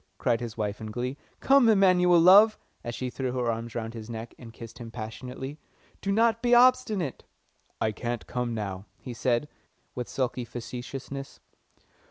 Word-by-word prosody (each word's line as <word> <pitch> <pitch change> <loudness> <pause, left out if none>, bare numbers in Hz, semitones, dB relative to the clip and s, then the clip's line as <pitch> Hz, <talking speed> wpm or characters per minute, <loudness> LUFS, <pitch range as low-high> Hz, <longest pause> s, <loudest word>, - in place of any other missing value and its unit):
cried 115 - +1
his 115 -2 -6
wife 105 0 -3
in 110 - -5
glee. 125 +4 -3 0.3
"Come, 270 -4 +5
Emanuel, 180 -4 +5
love," 200 +6 +7 0.3
and 120 - -4
she 125 -1 -4
threw 130 -1 -3
her 125 -2 0
arms 115 0 -5
round 115 -1 -4
his 115 -1 -8
neck, 115 0 -6
and 115 -2 -10
kissed 115 +1 -11
him 115 -1 -7
passionately. 125 +5 -7 0.4
"Do 200 - -1
not 225 +2 +3
be 245 0 +4
obstinate." 240 - +3 0.6
"I 110 - +1
can't 120 +2 -4
come 125 -2 -3
now," 100 -2 -4
he 125 - -8
said, 120 +3 0 0.5
with 125 -1 -5
sulky 130 -1 -2
facetiousness. 125 +3 -7
125 Hz, 165 wpm, -27 LUFS, 115-180 Hz, 0.6 s, love